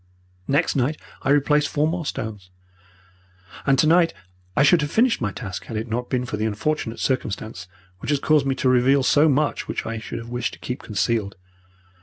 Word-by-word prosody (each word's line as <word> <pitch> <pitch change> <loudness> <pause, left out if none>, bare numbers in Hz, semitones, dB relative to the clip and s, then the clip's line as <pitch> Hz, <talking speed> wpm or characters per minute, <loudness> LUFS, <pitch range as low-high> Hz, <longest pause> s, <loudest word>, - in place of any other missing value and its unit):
Next 140 +3 +1
night 140 +3 +1 0.2
I - - -2
replaced 145 +1 +3
four 150 +1 +1
more 165 -1 -2
stones. 105 -4 -5 1.2
And 135 0 +4
tonight 165 +4 +4 0.4
I 140 - +4
should 165 +3 +5
have 150 - -2
finished 230 - +2
my 105 -3 0
task 95 -4 -6
had 115 - -5
it 110 +2 -3
not 120 +2 -3
been 125 -1 0
for 115 -4 -4
the 110 - -1
unfortunate 115 +2 -2
circumstance 110 -7 -2 0.3
which - - -6
has 145 - +3
caused 150 -1 +3
me 135 - +1
to 130 - 0
reveal 130 +2 +4
so 145 +4 +4
much 145 +1 0
which - - -3
I 115 -1 -3
should 110 - -6
have 115 0 -8
wished 120 0 -2
to - - -23
keep 125 - -5
concealed. 105 -1 -1
130 Hz, 195 wpm, -23 LUFS, 110-150 Hz, 1.2 s, should